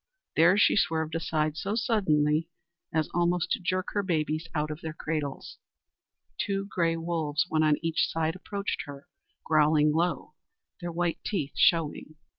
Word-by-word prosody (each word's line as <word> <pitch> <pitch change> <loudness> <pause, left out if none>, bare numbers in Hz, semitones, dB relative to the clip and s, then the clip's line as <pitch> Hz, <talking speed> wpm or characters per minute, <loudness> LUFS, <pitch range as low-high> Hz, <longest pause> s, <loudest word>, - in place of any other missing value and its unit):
There 175 +4 +5
she 210 - +5
swerved 160 -5 +1
aside 155 -2 -1
so 200 +5 -2
suddenly 165 - +2 0.4
as 160 -2 +1
almost 175 0 +1
to - - +1
jerk 185 +1 -1
her 205 - +1
babies 155 -3 -1
out 150 0 0
of 155 +2 -7
their 160 -1 -5
cradles. 150 -4 -4 0.8
Two 195 -1 -1
gray 170 -4 0
wolves, 165 -2 -1
one 155 - +2
on 155 -1 +4
each 165 0 +1
side, 160 0 -1
approached 200 +2 -4
her, 140 0 -10 0.4
growling 150 -1 +4
low 165 -1 -1 0.5
their 175 0 -4
white 170 0 -1
teeth 160 -10 -2
showing. 155 -2 +2
165 Hz, 150 wpm, -28 LUFS, 155-175 Hz, 0.8 s, There